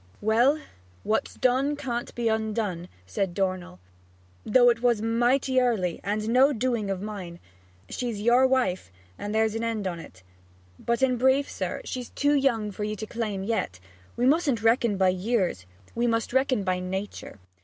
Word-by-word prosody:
'Well, 240 +8 +3 0.4
what's 220 - -1
done 260 +3 +1
can't 245 -4 -4
be 235 -1 -1
undone,' 215 -5 -1 0.2
said 175 - -2
Dornell, 185 - -2 0.6
'though 245 +1 +5
it 235 -1 -3
was 240 -3 +3
mighty 245 +4 +2
early, 205 -9 0
and 205 +2 -1
was 215 - -5
no 255 +5 +5
doing 235 -4 -1
of 195 0 -3
mine. 190 -5 -6 0.5
She's 235 - -4
your 240 +4 +4
wife; 245 - 0 0.3
and 205 +1 -4
there's 220 -1 +2
an 225 +1 -3
end 225 -3 -2
on't. 165 - -7 0.6
But 235 +2 -1
in 255 -2 +3
brief, 265 +3 +3
sir, - - -4
she's 250 -2 -5
too 290 +1 +1
young 240 -7 +1
for 210 - -5
you 210 0 -2
to 215 - -6
claim 215 -4 -3
yet; 195 - -2 0.4
we 245 - +1
mustn't 275 -5 +2
reckon 225 -2 +3
by 190 -1 +4
years; 185 - -1 0.3
we 240 +1 0
must 230 0 -1
reckon 260 -5 +2
by 185 -1 0
nature. 190 - -5
225 Hz, 165 wpm, -26 LUFS, 195-250 Hz, 0.6 s, though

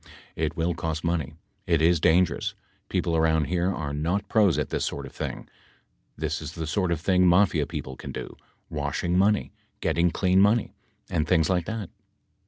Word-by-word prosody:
It 80 +1 -2
will 85 +1 +1
cost 80 -1 -3
money. 80 -4 -1 0.3
It 85 -3 +3
is 85 +1 +4
dangerous. 85 +4 +2 0.3
People 85 - 0
around 80 -1 +3
here 90 +4 0
are 75 -5 -4
not 85 +7 -1
pros 105 -6 +3
at - - -1
this - - -1
sort 70 - -3
of 65 - -10
thing. - - -5 0.7
This - - -2
is - - -6
the 80 - -4
sort 90 +2 0
of 85 - 0
thing 90 +1 +3
Mafia 90 -4 +3
peo - - -4
ple 65 - -8
can - - -7
do: - - -7 0.3
washing 75 +4 -2
money, 100 +3 +2 0.3
getting 85 +1 +2
clean 95 +2 +2
money, 105 +3 +3 0.3
and 80 -3 -1
things 85 -1 +3
like 90 -2 0
that. 110 -5 -4
85 Hz, 185 wpm, -26 LUFS, 80-90 Hz, 0.7 s, is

